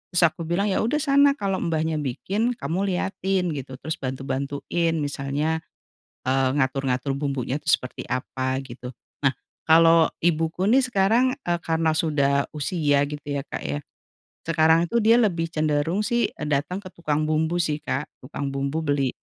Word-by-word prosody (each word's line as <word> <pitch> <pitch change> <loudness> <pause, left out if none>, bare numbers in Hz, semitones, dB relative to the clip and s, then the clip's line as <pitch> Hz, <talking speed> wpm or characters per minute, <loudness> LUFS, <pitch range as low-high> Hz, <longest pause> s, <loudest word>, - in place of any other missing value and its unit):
Terus 175 - +4
aku 160 0 +1
bilang, 195 +4 +1
"Ya, - - +1
udah 235 +7 0
sana 280 -1 +4
kalau 195 -6 -1
mbahnya 160 -1 -1
bikin, 200 - -1
kamu 195 -3 -2
liatin 185 -1 -1
gitu, 135 -3 -6
terus 155 +4 -5
bantu-bantuin 140 +5 -2
misalnya, 145 +2 -1 0.7
eee, 130 0 +2
ngatur-ngatur 130 0 0
bumbunya 140 -1 -2
tuh - - 0
seperti 125 - 0
apa," 130 +1 -2
gitu. 125 0 -8 0.3
Nah, 140 - +4 0.4
kalau 165 0 +6
ibuku 165 +2 0
nih 260 +5 +5
sekarang, 245 +4 +2
eee, 175 0 +1
karena 160 -1 +1
sudah 140 -3 +1
usia, 145 -2 +1
gitu 145 0 -7
ya, 140 -1 -4
Kak, - - -6
ya, 75 +1 -2 0.7
sekarang 160 +1 +4
tuh 235 - +3
dia 225 +2 +5
lebih 175 -8 +1
cenderung 155 +4 0
sih, 235 +2 +1
dateng 150 +4 -1
ke 190 -2 -8
tukang 155 -2 -1
bumbu 160 +2 0
sih, 155 -3 0
Kak, 150 - -2 0.2
tukang 140 +1 -5
bumbu 140 +4 -2
beli 145 -2 +1
160 Hz, 155 wpm, -24 LUFS, 140-180 Hz, 0.7 s, kalau